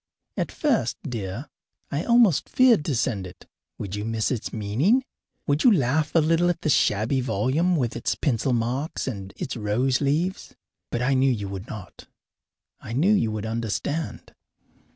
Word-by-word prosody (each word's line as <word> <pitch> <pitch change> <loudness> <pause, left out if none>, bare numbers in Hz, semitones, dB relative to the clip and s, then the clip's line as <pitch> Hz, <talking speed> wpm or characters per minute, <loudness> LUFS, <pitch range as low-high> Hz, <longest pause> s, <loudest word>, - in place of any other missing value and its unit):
At - - -2
first, 290 -7 0
dear, 115 +2 -5 0.4
I 145 +4 -2
almost 235 - +4
feared 245 -10 +5
to 145 - 0
send 105 -5 -1
it. 90 - -14 0.3
Would 100 -2 -6
you 105 0 -3
miss 115 0 -1
its 120 -4 -3
meaning? 125 - +1 0.4
Would 145 +2 +1
you 250 - +7
laugh 150 - +1
a - - +7
little 165 +3 +3
at 170 -1 -1
the 155 - +1
shabby 115 +3 +2
volume 130 - +1
with 125 -7 -1
its - - -1
pencil 130 -2 0
marks 125 +6 -1
and 100 -7 -5
its - - -4
rose 120 +5 0
leaves? 160 +7 -1 0.3
But 120 - -2
I 135 +2 +2
knew 135 0 +3
you 105 -5 -2
would 95 +1 -6
not; 100 -4 -10 0.7
I 115 - -8
knew 170 - +3
you 115 - +2
would 110 0 -4
understand. 115 +8 -3
130 Hz, 170 wpm, -25 LUFS, 110-160 Hz, 0.7 s, you